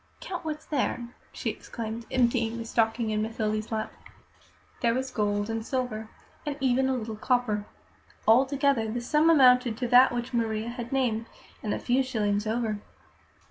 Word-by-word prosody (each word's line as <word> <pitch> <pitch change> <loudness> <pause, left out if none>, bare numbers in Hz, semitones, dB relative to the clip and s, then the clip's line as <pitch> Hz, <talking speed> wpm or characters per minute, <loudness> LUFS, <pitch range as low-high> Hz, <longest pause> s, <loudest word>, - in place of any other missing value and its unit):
"Count 360 -2 -6
what's 310 -1 -5
there," 250 -4 -1 0.2
she - - -2
exclaimed, 230 0 -6
emptying 235 -2 +1
the 230 - -5
stocking 225 0 +1
in 215 0 0
Mathilde's 215 -1 -2
lap. 220 -1 -2 0.9
There 235 -1 +2
were 260 - 0
gold 205 -2 0
and 225 0 -3
silver, 225 -3 -3 0.3
and 295 -2 -3
even 265 0 +2
a 265 - +1
little 220 -2 -4
copper. 215 -3 0 0.6
Altogether, 265 0 +3
the 240 - -2
sum 300 +6 +3
amounted 250 -6 +5
to 245 - -1
that 250 +2 +7
which 245 +1 -4
Maria 225 -1 -1
had 240 0 -6
named, 235 -4 0 0.3
and 210 - -3
a - - 0
few 255 +2 +1
shillings 215 -5 0
over. 220 -2 -1
235 Hz, 160 wpm, -27 LUFS, 220-255 Hz, 0.9 s, that